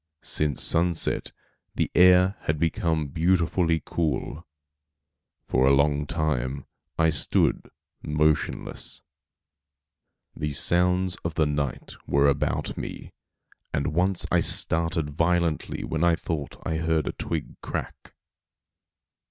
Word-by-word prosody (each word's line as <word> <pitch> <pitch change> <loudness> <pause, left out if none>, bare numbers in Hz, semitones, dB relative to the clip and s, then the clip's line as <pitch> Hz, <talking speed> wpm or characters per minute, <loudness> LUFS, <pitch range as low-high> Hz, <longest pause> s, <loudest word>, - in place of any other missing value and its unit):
Since 75 -2 -1
sunset 85 0 +1 0.4
the - - -1
air 90 +2 +5
had 80 - 0
become 80 -1 -1
beautifully 85 0 +1
cool. 80 0 -3 1.0
For 65 +1 +2
a 70 - +5
long 70 +1 +1
time 70 -5 -2 0.3
I 80 0 +3
stood 75 - +1 0.3
motionless. 75 0 -1 1.3
The 75 -1 -3
sounds 90 +4 +3
of 85 -2 -5
the 80 - +2
night 75 -2 -3
were 70 0 +3
about 70 - -1
me; - - -7 0.6
and 75 +2 -1
once 90 +2 +1
I - - +4
started 80 -2 +1
violently 85 +1 0
when 80 +1 -2
I 85 -1 +4
thought 80 -3 -5
I 80 - -1
heard 80 -2 0
a - - -2
twig - - -5
crack. - - -6
80 Hz, 110 wpm, -25 LUFS, 75-85 Hz, 1.3 s, air